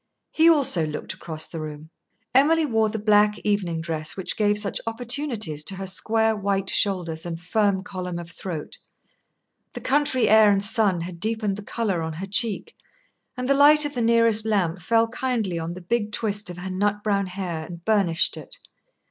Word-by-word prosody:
He 325 +1 +5
also 265 - +3
looked 150 - -5
across 160 -1 -6
the 165 - -7
room. 155 +1 -8 0.4
Emily 310 +5 +4
wore 225 -5 +1
the 220 - -4
black 210 0 +3
evening 185 -6 -1
dress 160 0 -3
which 190 - -4
gave 210 -1 +2
such 210 -1 -1
opportunities 230 - -2
to 195 - -1
her 195 +1 -6
square 220 +4 +1
white 195 -1 -1
shoulders 175 -5 0
and 170 -1 -5
firm 195 +1 0
column 180 -3 -5
of 170 0 -8
throat; 170 -6 -7 0.9
the - - -6
country 270 -2 +1
air 215 0 +6
and 200 0 +2
sun 205 -6 +2
had 170 0 -7
deepened 215 0 -1
the 205 - -8
colour 205 -4 -2
on 160 0 -4
her 175 +5 -6
cheek, 220 - -1 0.6
and 250 0 -3
the 275 - +4
light 295 +2 +6
of 290 - -4
the 245 - -2
nearest 230 -1 +4
lamp 195 -5 0
fell 225 +6 +2
kindly 230 -7 -2
on 165 +1 -5
the 185 - -9
big 210 +3 -1
twist 205 -2 -1
of 175 - -8
her 185 +1 -6
nut 205 +2 -1
brown 200 -2 0
hair, 180 -4 -5
and 170 -1 -11
burnished 195 -7 +1
it. - - -11
205 Hz, 185 wpm, -24 LUFS, 175-225 Hz, 0.9 s, air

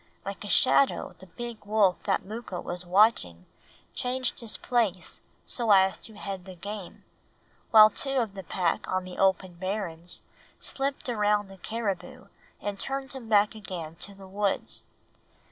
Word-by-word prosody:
Like 200 +2 -5
a 205 - -6
shadow 135 -5 +4
the 190 - -13
big 235 +5 -7
wolf 205 -3 +3
that 195 - +1
Mooka 215 -3 -6
was 180 0 -6
watching 175 - +3 0.5
changed 255 +1 -1
his 230 -3 -1
place 205 -8 -1 0.2
so 235 -3 -2
as 190 -1 +5
to 220 - -5
head 195 -3 -6
the 190 -1 -9
game, 200 +1 -8 0.7
while 215 -1 +9
two 270 +5 0
of 225 -6 0
the 195 - -6
pack 175 -1 -1
on 185 0 0
the 185 0 -9
open 190 -1 +2
barrens 180 -3 -1 0.3
slipped 275 0 -3
around 210 -3 +1
the 195 - -12
caribou 210 -2 -4 0.3
and 200 -1 -4
turned 270 -1 -2
him 250 -4 -8
back 210 -1 +4
again 180 -7 -7
to 200 - -7
the 195 -1 -12
woods. 200 +1 0
200 Hz, 155 wpm, -28 LUFS, 185-220 Hz, 0.7 s, while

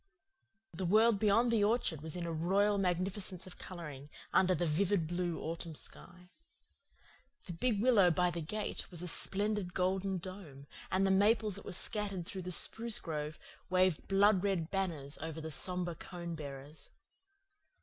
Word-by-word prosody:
The 180 +3 -5
world 215 +2 +4
beyond 220 +3 +3
the 220 -3 +3
orchard 205 - +1
was 160 +1 -5
in 175 -1 -3
a 165 - -3
royal 200 +5 +2
magnificence 185 0 -1
of 185 - -12
colouring, 150 -6 -8 0.2
under 185 -1 +4
the 175 - 0
vivid 175 +3 +1
blue 175 0 -2
autumn 165 0 -5
sky. 180 +4 -8 1.1
The 175 - -6
big 210 +5 0
willow 220 -8 +6
by 180 +1 +2
the 170 - -4
gate 210 +7 -4
was 175 -1 -5
a - - -4
splendid 200 +1 +1
golden 190 +1 0
dome, 170 -7 -9 0.2
and 190 +1 +2
the 195 - +3
maples 210 +2 +3
that 200 - -7
were - - -6
scattered 195 -1 -1
through 190 +2 -6
the 180 0 -5
spruce 225 +5 +4
grove 155 -1 -4 0.3
waved 185 -3 +2
blood 195 0 +4
red 185 -5 -1
banners 165 -8 0
over 160 +1 -5
the 160 0 -6
sombre 180 +2 -2
cone 170 +1 -7
bearers. 145 -1 -9
180 Hz, 160 wpm, -33 LUFS, 165-200 Hz, 1.1 s, willow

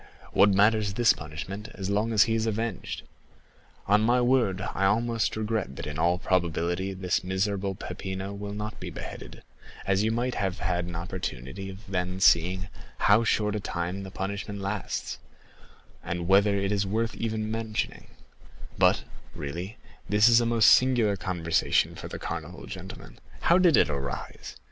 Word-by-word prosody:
What 100 +2 +6
matters 105 +1 +3
this 120 0 +5
punishment, 95 +8 -7
as 95 -1 -3
long 105 +3 +1
as 110 -1 +6
he 115 - 0
is 115 0 0
avenged? 110 -1 -3 0.8
On 105 +2 +4
my 120 +3 +3
word, 120 -7 +2
I 95 - -1
almost 115 +2 +1
regret 110 -9 -2
that - - -6
in 75 0 -5
all 85 +2 +3
probability 90 +1 0
this 90 -1 -1
miserable 95 +1 -1
Peppino 95 +1 -5
will 100 0 -6
not 105 +1 -5
be - - -6
beheaded, - - -9 0.4
as 100 0 +2
you 110 - +1
might 120 +2 -1
have 95 -3 -2
had 90 -2 -1
an 85 -1 -7
opportunity 90 +1 -5
then 90 -1 -2
of 95 - -1
seeing 90 +2 +4 0.3
how 105 +3 +4
short 105 -2 +1
a - - -1
time 90 0 -3
the 95 - -7
punishment 100 +1 -4
lasts, 100 +1 -3 0.8
and 85 0 -3
whether 100 +2 +5
it 100 0 0
is 100 -1 0
worth 115 +3 -1
even 110 -1 -3
mentioning; 110 -1 -3 0.7
but, - - +4 0.3
really 85 +9 -5 0.3
this 105 +2 +5
is 120 0 +6
a 115 - +1
most 115 -2 +5
singular 120 -5 +4
conversation 90 -3 +1
for - - -8
the - - -6
Carnival, - - -6
gentlemen; - - -9 0.2
how 170 +2 +4
did 175 -8 +5
it - - +5
arise? 70 -3 -5
100 Hz, 165 wpm, -27 LUFS, 90-110 Hz, 0.8 s, What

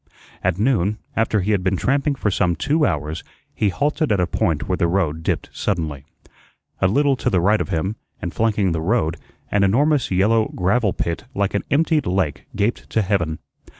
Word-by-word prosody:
At 90 -1 +1
noon, 105 -3 +1 0.2
after 110 -2 +1
he 100 +4 0
had 100 -3 +1
been 95 0 +1
tramping 140 - +1
for 105 -6 -1
some 90 -2 +1
two 150 - +1
hours, 75 +2 -3 0.3
he 105 - +1
halted 145 - 0
at 100 - +2
a 90 - +3
point 80 -3 -1
where 95 - +1
the 85 - +2
road 85 -3 0
dipped - - -2
suddenly. 80 -8 -2 0.8
A 95 - +5
little 140 +7 +3
to - - 0
the 90 - +2
right 105 +5 +3
of - - -3
him, 95 +7 -1 0.2
and 85 - -5
flanking 105 -4 +1
the 80 -1 -1
road, 85 -3 0 0.3
an 100 -1 +3
enormous 140 +7 +2
yellow 110 +4 +3
gravel 100 +3 +2
pit 85 -1 -3
like 100 0 0
an 100 - 0
emptied 155 0 +2
lake 90 -6 -1
gaped 105 +3 -1
to 110 - +1
heaven. 85 -5 0
100 Hz, 190 wpm, -21 LUFS, 85-115 Hz, 0.8 s, A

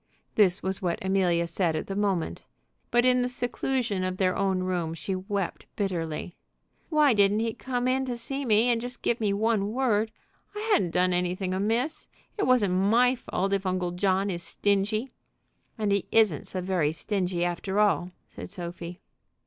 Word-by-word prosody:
This 195 -3 +3
was 190 +1 -2
what 175 -2 0
Amelia 180 -3 +2
said 170 -1 0
at 155 - -2
the 195 - -5
moment; 195 -5 -1 0.5
but 240 +1 +3
in 250 0 +4
the 245 - +1
seclusion 245 -4 -1
of 185 0 -2
their 185 -1 +2
own 190 -2 0
room 175 -3 -2
she 190 +3 -3
wept 195 0 -3
bitterly. 175 -4 -3 0.6
"Why 300 -5 +4
didn't 205 0 +3
he 225 -1 -1
come 250 0 -2
in 265 +1 +1
to 245 -2 -3
see 270 +4 -2
me 225 0 +3
and 235 -1 +2
just 245 0 -7
give 235 - +1
me 210 -3 +1
one 210 0 +1
word? 225 -4 +1 0.5
I - - -4
hadn't 180 - +3
done 180 +1 +2
anything 180 +1 -1
amiss. 225 +10 -1 0.3
It 410 - 0
wasn't 230 -8 +3
my 225 +7 +4
fault 195 -5 -2
if 195 -1 0
Uncle 185 -1 -1
John 190 +2 +1
is 175 -1 -4
stingy." 205 +6 0 0.7
"And 210 -2 0
he 200 -1 +1
isn't 215 -9 +3
so 185 - -2
very 180 -5 +1
stingy, 180 -1 -1
after 190 +3 -2
all," 200 -4 +2 0.2
said - - -9
Sophie. 175 -1 -7
195 Hz, 175 wpm, -27 LUFS, 180-230 Hz, 0.7 s, in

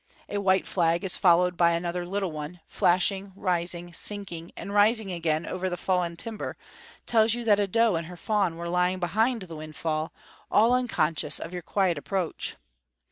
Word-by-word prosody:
A 205 - -2
white 190 -1 +2
flag 170 +1 +1
followed 180 0 +4
by 170 0 +4
another 175 +1 -2
little 195 -1 -2
one, 155 +3 -7
flashing, 190 +2 +2
rising, 175 -2 -2
sinking 175 -4 -2
and 200 - -6
rising 210 0 +4
again 165 -2 -1
over 185 0 -3
the 180 - -3
fallen 180 -2 0
timber, 215 +5 -5 0.5
tells 225 -1 +3
you 240 - -4
that 210 -3 +4
a 205 - +1
doe 230 +2 +3
and 165 -1 -2
her 180 0 -10
fawn 200 -4 0
were 170 0 -5
lying 180 +1 +1
behind 220 +6 +1
the 165 -3 -9
windfall, 155 0 -3 0.4
all 225 +4 +4
unconscious 165 -12 +1
of 165 - -6
your 180 - -4
quiet 180 -3 0
approach. 185 +1 -3
180 Hz, 170 wpm, -27 LUFS, 170-205 Hz, 0.5 s, followed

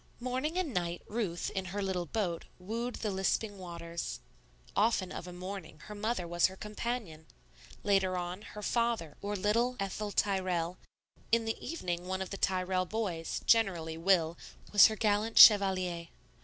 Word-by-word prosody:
Morning 260 +7 -2
and 340 -8 -1
night 175 -2 -2
Ruth, 205 -7 -2
in 190 -1 -3
her 195 +3 -4
little 180 -3 -2
boat, 180 -3 -2
wooed 230 +6 -4
the 215 - -2
lisping 195 +2 -1
waters. 170 - -5 0.6
Often 210 -3 +2
of 180 - -6
a - - -7
morning 180 -2 -7
her 210 - -9
mother 210 -3 -2
was 175 0 +3
her 190 - -10
companion; 210 -7 -5 0.6
later 190 -2 +2
on, 180 +2 -4 0.2
her 210 - -6
father 230 -10 0
or 205 +1 -2
little 230 +6 +1
Ethel 200 +1 -3
Tyrrell; 185 -4 0 0.5
in 230 0 +3
the 225 - -3
evening 180 - -3
one 190 0 -1
of 190 - -10
the 195 - -4
Tyrrell 185 -1 0
boys, 180 -7 -3
generally 180 -8 +2
Will, 165 -1 +2 0.3
was 205 -1 +9
her 220 - -3
gallant 215 +1 +1
chevalier. 185 -5 +7
190 Hz, 155 wpm, -32 LUFS, 175-215 Hz, 0.6 s, was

